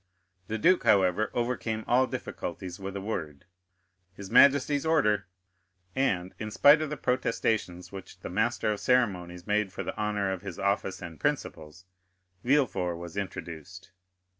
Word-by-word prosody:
The 110 - -2
duke, 180 - +4
however, 95 +2 +3
overcame 120 -2 -2
all 130 +2 +3
difficulties 90 -5 -6
with 95 0 -6
a 100 - -4
word—his 90 +1 -9
majesty's 140 +1 +5
order; 105 - +2 0.7
and, 95 -9 0
in 110 - -4
spite 145 +8 +6
of 155 - -2
the 150 - -4
protestations 110 -8 -1
which 95 -1 -10
the - - -6
master 110 +2 0
of 105 - -3
ceremonies 90 -8 0
made 105 -2 0
for 100 - -5
the - - -5
honor 105 -2 -1
of 95 -2 -4
his 95 -4 -7
office 100 -1 -1
and 80 -4 -9
principles, 80 +3 -3 0.6
Villefort 115 -11 +1
was 85 +1 -9
introduced. 95 -2 -7
100 Hz, 140 wpm, -28 LUFS, 90-120 Hz, 0.7 s, spite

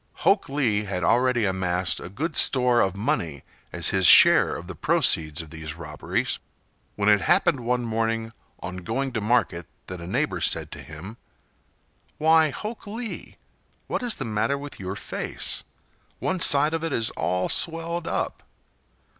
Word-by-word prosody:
Hok 195 -2 +3
Lee 115 -7 0
had 95 -3 -4
already 120 +2 +2
amassed 90 -1 -1
a - - -8
good 155 - -4
store 125 -2 +3
of 95 -1 0
money 85 - -2 0.3
as - - +3
his 95 -2 +4
share - - +8
of 85 - -8
the 95 - -7
proceeds 80 0 +1
of 80 - -15
these 80 -1 -7
robberies, 75 -3 -3 0.6
when 100 0 -1
it 105 -1 +5
happened 135 - +2
one 125 0 -1
morning 115 0 -2 0.3
on 90 0 -6
going 120 +9 -3
to 110 - -2
market 105 -7 0 0.2
that 90 -2 -8
a 85 - -8
neighbor - - -1
said - - 0
to - - -8
him: 90 +9 -10 1.0
"Why, 160 0 +4
Hok 215 - -7
Lee, 225 +2 -7 0.5
what - - -3
is 245 -2 0
the - - -5
matter 115 +5 -1
with 145 +1 -9
your 95 0 -5
face? - - -3 0.5
One 185 0 -2
side 150 -1 +4
of 165 0 -2
it 165 -3 -2
is 115 -1 +1
all 90 0 -1
swelled 165 +1 0
up." - - -3
115 Hz, 165 wpm, -24 LUFS, 90-140 Hz, 1.0 s, share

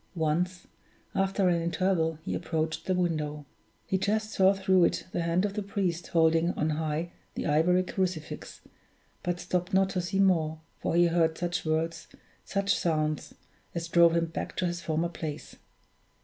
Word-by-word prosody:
Once, 175 +3 0 0.5
after 195 0 +1
an 170 -1 +2
interval, 170 -1 +1
he - - -2
approached 160 -1 -2
the 185 - +2
window. 155 -4 -1 0.4
He 190 - 0
just 215 +2 0
saw 190 -2 +5
through 190 -2 +4
it - - -1
the 175 - -1
hand 170 +3 +1
of 200 - -2
the 210 - -2
priest 185 -4 -2
holding 165 +1 +3
on 155 +1 0
high 155 +2 -2 0.2
the - - -3
ivory 175 +5 +3
crucifix; 180 -4 -4 0.6
but 175 0 -2
stopped 180 +1 -1
not 190 0 +3
to 180 - -1
see 175 +3 -2
more, 160 -5 +2 0.2
for - - -1
he 175 0 +6
heard 165 -1 +2
such 175 0 -2
words, 160 +1 -1 0.4
such 200 0 0
sounds, 155 -2 -1 0.4
as 170 0 -2
drove 170 0 +5
him 170 0 +2
back 165 - -5
to 185 - +1
his 175 0 -2
former 160 +1 0
place. 155 -3 -6
170 Hz, 165 wpm, -29 LUFS, 160-185 Hz, 0.6 s, he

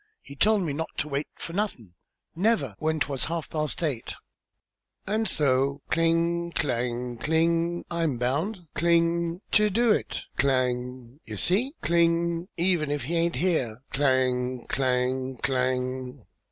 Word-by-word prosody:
He 140 - -11
told 210 +5 +3
me 155 -5 -2
not 160 +3 -3
to 150 - -1
wait 140 0 -2
for 165 - -7
nothin', 175 - -3 0.4
never, 175 - +1
when 155 0 0
'twas 140 -3 -1
half 165 -1 -3
past 155 +1 -2
eight, 135 -8 -2 0.9
and 215 +2 0
so" 140 0 +2
cling, 170 +1 +1
clang, 120 -2 -1
cling 165 +4 +1
"I'm 165 -6 0
bound" 160 - -1
cling 170 +1 +2
"ter 210 -1 +4
do 230 +3 +3
it!" - - -1
Clang. 125 -1 0
"You 110 -1 -6
see" 235 - +1
cling 170 0 +2
"even 170 -3 +2
if 145 -3 -1
he 165 +7 -2
aint 170 0 +1
here 130 -10 0
" - - -39
Clang, 130 -2 +1
clang, 130 0 0
clang. 130 -1 -1
150 Hz, 140 wpm, -27 LUFS, 130-170 Hz, 0.9 s, ter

